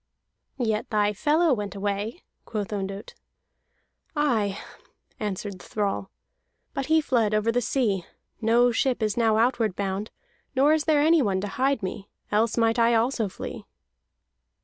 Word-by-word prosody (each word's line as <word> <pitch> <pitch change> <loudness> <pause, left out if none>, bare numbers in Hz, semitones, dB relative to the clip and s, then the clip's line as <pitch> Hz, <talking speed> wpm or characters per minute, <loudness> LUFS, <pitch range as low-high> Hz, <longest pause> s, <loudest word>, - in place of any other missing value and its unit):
"Yet 220 -4 -1
thy 210 -1 +2
fellow 305 - +3
went 205 -3 -4
away," 205 - -3 0.2
quoth 210 -2 -4
Ondott. 195 0 -5 1.0
"Aye," 225 -10 +1 0.6
answered 200 -2 -4
the - - -13
thrall, 200 -2 -2 0.6
"but 275 - -3
he 320 +1 +4
fled 230 -7 +1
over 215 +2 +2
the 245 +1 +1
sea. 210 -7 0 0.3
No 235 +2 +4
ship 245 0 0
is 215 -2 0
now 225 -2 +3
outward 230 -4 +2
bound, 200 +1 -2 0.5
nor 280 +4 +5
is 315 -1 +1
there 305 -2 +4
anyone 290 - +3
to 205 - -3
hide 265 +1 0
me. 195 +1 -5 0.2
Else 220 +2 +2
might 230 0 +2
I 235 0 +4
also 230 -2 +1
flee." - - -7
225 Hz, 145 wpm, -26 LUFS, 205-255 Hz, 1.0 s, nor